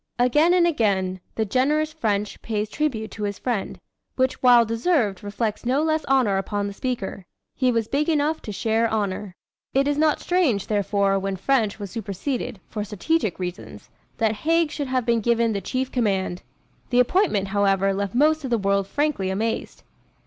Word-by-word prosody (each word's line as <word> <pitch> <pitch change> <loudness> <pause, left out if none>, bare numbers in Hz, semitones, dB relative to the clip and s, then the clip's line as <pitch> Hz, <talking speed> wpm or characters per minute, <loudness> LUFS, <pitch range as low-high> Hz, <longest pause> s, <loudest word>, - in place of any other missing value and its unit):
Again 295 +9 +4
and 350 -1 +4
again, 195 - +1 0.2
the 220 - 0
generous 300 +8 +1
French 210 -8 -2
pays 215 -1 -2
tribute 235 -6 -2
to 215 - -9
his 205 -1 -2
friend, 235 -6 -3 0.4
which 260 0 0
while 245 -2 +6
deserved 230 - 0
reflects 210 +1 -3
no 260 +5 +1
less 315 0 +1
honor 255 -8 +2
upon 205 +1 -2
the 200 - -4
speaker. 200 -5 -4 0.3
He 255 -1 +2
was 230 -2 0
big 295 +5 0
enough 310 0 +1
to 210 - -6
share 225 +2 +1
honor. 205 -3 -2 0.4
It 275 +1 +3
is 290 0 0
not 310 -1 +3
strange, 325 - +1
therefore, 200 -1 +1
when 195 0 -2
French 220 +1 +1
was 200 -3 -7
superseded, 230 +2 -4
for 210 -2 -4
strategic 215 - -1
reasons, 180 -1 -7 0.3
that 220 -1 +2
Haig 330 +4 +1
should 285 -2 -3
have 255 -2 0
been 235 -1 +2
given 235 0 +2
the 200 - -2
chief 260 +7 -2
command. 190 -7 0 0.5
The 245 - +3
appointment, 245 - +2
however, 195 -1 +2
left 200 +1 -3
most 310 +3 +3
of 265 - -3
the 235 - +2
world 200 -1 +1
frankly 290 -8 0
amazed. 220 +4 -3
225 Hz, 175 wpm, -23 LUFS, 200-275 Hz, 0.5 s, while